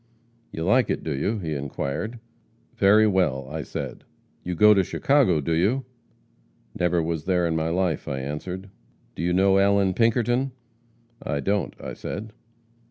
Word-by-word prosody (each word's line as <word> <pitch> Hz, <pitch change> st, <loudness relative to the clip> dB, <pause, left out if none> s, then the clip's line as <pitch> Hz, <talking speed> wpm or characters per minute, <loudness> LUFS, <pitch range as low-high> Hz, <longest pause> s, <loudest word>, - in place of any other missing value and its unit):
'You 80 Hz, -, -4 dB
like 110 Hz, +8 st, +3 dB
it, -, -, -2 dB
do 80 Hz, -, -2 dB
you?' 100 Hz, +11 st, -1 dB
he 80 Hz, -6 st, -4 dB
inquired. 70 Hz, -, -4 dB, 0.6 s
'Very 105 Hz, +3 st, +5 dB
well,' 85 Hz, -10 st, +1 dB
I 80 Hz, +1 st, -3 dB
said. -, -, -6 dB, 0.4 s
'You 90 Hz, 0 st, -3 dB
go 105 Hz, +4 st, +7 dB
to 100 Hz, -2 st, +3 dB
Chicago, 135 Hz, -, +2 dB
do 80 Hz, -, -3 dB
you?' 110 Hz, +11 st, +1 dB, 0.9 s
'Never 90 Hz, -1 st, +1 dB
was 80 Hz, -1 st, -3 dB
there 90 Hz, -2 st, +2 dB
in 80 Hz, -1 st, 0 dB
my 80 Hz, 0 st, 0 dB
life,' 90 Hz, -2 st, -1 dB
I 70 Hz, -2 st, -2 dB
answered. 90 Hz, +8 st, -5 dB, 0.4 s
'Do -, -, -6 dB
you 85 Hz, +1 st, 0 dB
know 95 Hz, +2 st, +4 dB
Allan 100 Hz, -1 st, +3 dB
Pinkerton?' 120 Hz, +4 st, +1 dB, 0.7 s
'I 70 Hz, -, -2 dB
don't,' 100 Hz, +4 st, -1 dB
I -, -, -6 dB
said. 110 Hz, +1 st, -6 dB
95 Hz, 160 wpm, -24 LUFS, 80-105 Hz, 0.9 s, go